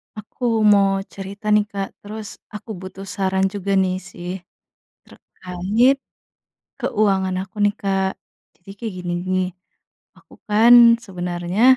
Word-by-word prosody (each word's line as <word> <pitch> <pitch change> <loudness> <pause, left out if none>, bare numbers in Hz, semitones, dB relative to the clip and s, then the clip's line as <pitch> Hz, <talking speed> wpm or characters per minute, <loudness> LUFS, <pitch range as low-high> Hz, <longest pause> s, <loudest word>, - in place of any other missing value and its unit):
Aku 225 +1 -2
mau 200 -2 +4
cerita 200 +2 -5
nih 210 0 +4
Kak, 200 -1 -4
terus 215 0 -8
aku 210 +2 -10
butuh 190 +1 -9
saran 190 0 0
juga 200 -1 -2
nih 185 -1 +2
sih, 180 -2 -9 0.7
terkait 205 +9 0 0.8
keuangan 195 -3 +1
aku 195 +3 -12
nih 205 0 +3
Kak. 195 -1 -1 0.4
Jadi 180 +2 -16
kayak 225 -1 -4
gini 175 -1 -3
nih, 185 0 0 0.7
aku - - -19
kan 225 +3 +6 0.3
sebenarnya 180 +1 -3
195 Hz, 120 wpm, -21 LUFS, 185-210 Hz, 0.8 s, kan